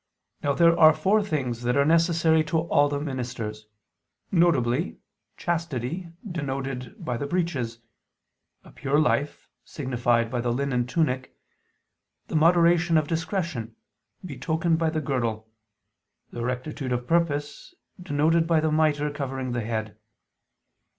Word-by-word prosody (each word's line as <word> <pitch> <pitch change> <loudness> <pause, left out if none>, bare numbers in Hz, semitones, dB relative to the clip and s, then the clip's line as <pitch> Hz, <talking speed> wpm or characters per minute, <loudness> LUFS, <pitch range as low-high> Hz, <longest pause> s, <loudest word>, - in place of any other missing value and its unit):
Now 145 - +1
there 170 +2 +5
are 155 -1 +8
four 210 +3 +2
things 130 - -2
that 125 +2 0
are 140 - +4
necessary 165 0 +3
to 160 +2 0
all 145 -3 +2
His 145 0 -2
ministers, 120 -6 -5 0.6
viz. 160 -5 +2 0.4
chastity 170 0 -3 0.2
denoted 135 - -4
by 120 -2 -2
the 140 - -3
breeches; 145 -9 -2 0.9
a - - -15
pure 140 +1 -1
life, 150 -1 0 0.2
signified 120 -4 0
by 125 -2 -1
the 120 0 -1
linen 125 -1 -1
tunic; 130 -3 -1 0.9
the - - -4
moderation 170 +1 +4
of 155 -2 +1
discretion, 160 - -3 0.5
betokened 160 +2 -1
by 165 -1 +2
the 155 0 -2
girdle; 115 -6 -2 0.8
and 120 -1 -4
rectitude 130 +1 -4
of 120 0 -2
purpose, 160 - -1 0.3
denoted 165 0 +2
by 165 -1 +3
the 155 0 0
mitre 150 -1 +2
covering 135 -3 -4
the 120 0 -1
head. 110 -1 -4
145 Hz, 130 wpm, -25 LUFS, 125-165 Hz, 0.9 s, are